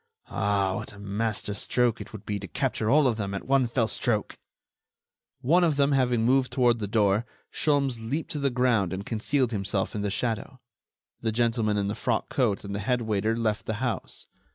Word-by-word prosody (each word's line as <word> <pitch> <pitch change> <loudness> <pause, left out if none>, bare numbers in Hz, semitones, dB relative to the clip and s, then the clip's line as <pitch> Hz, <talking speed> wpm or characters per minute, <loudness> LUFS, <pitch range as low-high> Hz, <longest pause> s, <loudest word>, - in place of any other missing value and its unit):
Ah! 100 -2 +1
what - - -7
a - - -13
master 105 +1 -2
stroke 120 +3 0
it - - -9
would 110 -3 -10
be 105 -1 -2
to 100 - -7
capture 110 +6 -1
all 150 +2 +5
of 120 -4 +2
them 100 -2 -3
at 100 - -5
one 135 -1 +3
fell 115 -1 +1
stroke!" 110 -2 -1 1.0
One 170 +8 +4
of 160 -4 +3
them, 140 0 +3
having 125 -4 +2
moved 130 +1 +3
toward 120 -3 +3
the 105 - -2
door, 105 0 +2 0.3
Sholmes 140 -5 +1
leaped 150 +5 -2
to 150 - -3
the 140 -1 +2
ground 120 -7 +1
and 95 +2 -4
concealed 125 +3 0
himself 100 -2 -1
in 105 - -3
the 100 - -1
shadow. 115 +4 -2 0.6
The 115 - -1
gentleman 115 -2 +1
in 100 -1 0
the 100 - -1
frock 115 0 -1
coat 115 -7 +1
and 100 0 -6
the 100 - -2
head 120 +4 0
waiter 110 +1 0
left 110 -2 -1
the 110 - -1
house. 120 -2 -4
115 Hz, 200 wpm, -27 LUFS, 105-125 Hz, 1.0 s, all